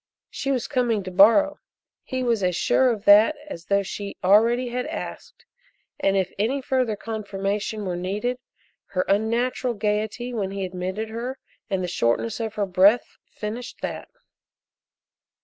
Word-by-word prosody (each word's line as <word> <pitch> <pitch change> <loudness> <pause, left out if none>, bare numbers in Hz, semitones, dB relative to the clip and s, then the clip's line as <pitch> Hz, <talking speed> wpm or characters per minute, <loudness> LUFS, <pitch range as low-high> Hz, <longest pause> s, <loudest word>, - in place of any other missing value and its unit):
She 275 - -4
was 260 -1 0
coming 240 -7 0
to 185 - -6
borrow 230 +11 +5 0.4
he 260 0 -3
was 235 -4 +1
as 180 -2 +1
sure 260 +7 +3
of 220 -3 -3
that 210 +9 +7
as 170 - -8
though 200 0 +2
she 200 +1 -6
already 230 +6 +4
had 250 +1 -3
asked, - - -7 0.5
and 195 0 +2
if 190 -1 -1
any 245 +7 +1
further 255 -4 0
confirmation 205 -1 -3
were 180 -2 -2
needed, 205 +8 -2 0.5
her 185 -1 -2
unnatural 235 +4 0
gayety 215 +4 -2
when 205 -5 -2
he 195 0 -3
admitted 185 +4 -4
her 240 +4 -5 0.3
and 190 -2 -1
the - - -1
shortness 175 - 0
of 220 -1 -4
her 205 - 0
breath 195 +5 +3
finished 225 +4 -6
that. - - -4
215 Hz, 150 wpm, -24 LUFS, 195-245 Hz, 0.5 s, that